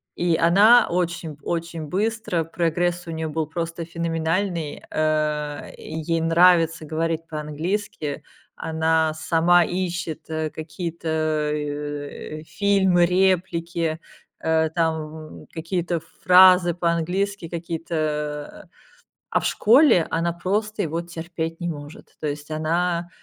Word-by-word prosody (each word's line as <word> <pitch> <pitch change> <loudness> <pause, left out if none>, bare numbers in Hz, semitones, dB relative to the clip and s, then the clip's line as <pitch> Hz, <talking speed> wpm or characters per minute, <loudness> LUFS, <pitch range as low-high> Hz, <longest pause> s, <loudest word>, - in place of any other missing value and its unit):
И 175 -1 +1
она 205 +8 +6
очень_ 170 -3 -2
очень 170 -1 -3
быстро, 210 -2 -1
прогресс 175 +2 -1
у - - -4
нее 160 0 -3
был 155 0 -2
просто 165 +1 -4
феноменальный, 165 0 -2
э, 150 -1 -1
ей 160 +1 -3
нравится 165 -1 +4
говорить 165 +1 -2
по-английски, 155 0 -3 0.3
она 160 0 +1
сама 165 +2 +4
ищет 175 -3 -3
какие-то, 160 +2 -5 0.5
э, 145 +1 -5
фильмы, 190 -2 +3
реплики, 170 -3 +1 0.4
э, 160 0 +1
там 160 -2 -3
какие-то 170 0 -2 0.2
фразы 180 0 +7
по-английски, 180 +3 -1
какие-то, 170 0 -4 0.7
э, - - -28 0.6
а - - +3
в - - -4
школе 235 - +5
она 170 +1 0
просто 205 +5 -1
его 165 0 -2
терпеть 165 -1 -5
не 175 - -2
может. 145 -1 -9
То 155 - -3
есть 145 +1 -5
она, 170 +2 0
165 Hz, 110 wpm, -23 LUFS, 160-175 Hz, 0.7 s, фразы